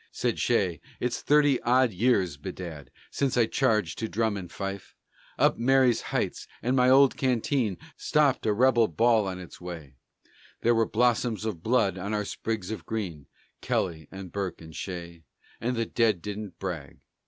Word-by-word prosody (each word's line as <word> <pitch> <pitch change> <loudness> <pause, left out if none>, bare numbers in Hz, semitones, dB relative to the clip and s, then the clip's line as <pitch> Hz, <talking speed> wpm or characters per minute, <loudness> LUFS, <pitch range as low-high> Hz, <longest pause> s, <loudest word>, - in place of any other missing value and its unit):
Said - - -1
Shea, - - +1 0.2
"It's 125 -1 -2
thirty 145 -3 +4
odd 125 0 +3
years, 95 - +2
bedad, 80 -1 -8 0.2
Since 135 -3 0
I 120 - +5
charged 110 - +1
to 110 - -2
drum 110 -2 0
and 90 -3 -7
fife 100 -1 -6 0.4
Up - - +3
Marye's 130 -1 +4
Heights, - - -2 0.2
and 125 +2 +1
my 125 -1 +4
old 135 0 +6
canteen 125 -5 0 0.2
Stopped 145 -6 +2
a - - +4
rebel 120 +1 +4
ball 110 +4 +3
on 95 -1 -4
its 90 -1 -11
way; 85 -6 -8 0.7
There 120 - +4
were 115 -1 +2
blossoms 115 -1 +1
of 100 -7 -3
blood 110 -4 +1
on 100 +3 -2
our 105 -1 -1
sprigs 110 -2 -4
of 110 - -5
green 90 -10 -4 0.3
Kelly 80 -4 -1
and 95 -2 -9
Burke 100 -2 -3
and 80 -1 -12
Shea 85 -3 -6 0.4
And 125 +3 -1
the 115 0 0
dead 110 -7 +1
didn't 105 -4 -6
brag." 85 -8 -6
110 Hz, 165 wpm, -27 LUFS, 90-120 Hz, 0.7 s, old